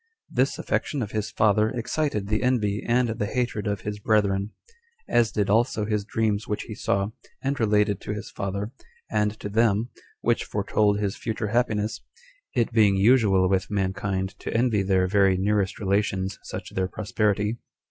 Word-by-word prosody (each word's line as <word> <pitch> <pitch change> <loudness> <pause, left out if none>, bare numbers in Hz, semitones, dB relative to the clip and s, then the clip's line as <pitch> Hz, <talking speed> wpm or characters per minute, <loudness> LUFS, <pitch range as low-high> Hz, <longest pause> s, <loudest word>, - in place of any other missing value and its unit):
This - - +1
affection 140 -6 -1
of 105 - -6
his 110 -1 -2
father 105 0 +3
excited 120 -2 -2
the 110 +1 0
envy 110 -5 +1
and 120 +1 +2
the 110 -2 -2
hatred 120 -3 -2
of 100 -1 -2
his 105 0 -5
brethren; 100 -2 +1 0.6
as 115 -2 +3
did 105 -2 0
also 110 0 +2
his 105 -1 -1
dreams 110 -1 0
which 105 - -2
he 110 - -7
saw, 100 -1 0 0.3
and 135 0 -1
related 105 -2 +2
to - - -5
his 105 - -7
father, 100 +2 -3 0.4
and 105 0 0
to - - -5
them, 110 +2 +2 0.3
which - - +1
foretold 105 -1 +1
his 100 -2 -1
future 110 -2 -3
happiness, 110 -2 0 0.5
it 120 -1 +1
being 105 -3 +5
usual 100 -3 +4
with 95 0 0
mankind 95 -1 -1
to - - -5
envy 115 -4 +2
their 95 -1 +2
very 95 -1 +3
nearest 100 0 +1
relations 95 -2 0
such - - -7
their 95 0 0
prosperity. 105 +2 -1
105 Hz, 165 wpm, -25 LUFS, 100-110 Hz, 0.6 s, being